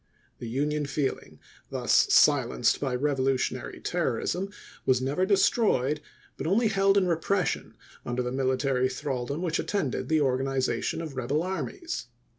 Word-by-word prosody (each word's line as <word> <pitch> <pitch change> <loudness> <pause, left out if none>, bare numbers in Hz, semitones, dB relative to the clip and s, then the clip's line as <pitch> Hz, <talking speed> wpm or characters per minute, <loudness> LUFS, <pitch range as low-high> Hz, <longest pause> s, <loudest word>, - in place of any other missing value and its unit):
The 115 - -6
Union 145 +4 -1
feeling, 140 -1 -3 0.3
thus - - +2
silenced 65 -1 +4
by 135 -3 -1
revolutionary 135 -1 -1
terrorism, 190 +2 -1 0.3
was 130 -1 +3
never 145 +9 0
destroyed, 190 - +2 0.4
but - - -3
only 220 +5 +3
held 195 -1 +3
in 195 - +4
repression 180 +3 -1 0.3
under 120 +1 -2
the 125 - -3
military 130 0 +1
thraldom 135 +3 -3
which 165 -2 0
attended 165 -11 -2
the 160 -1 +3
organization 135 +3 0
of 155 -4 -7
rebel 135 +5 -1
armies. 260 - -4
145 Hz, 130 wpm, -27 LUFS, 130-180 Hz, 0.4 s, silenced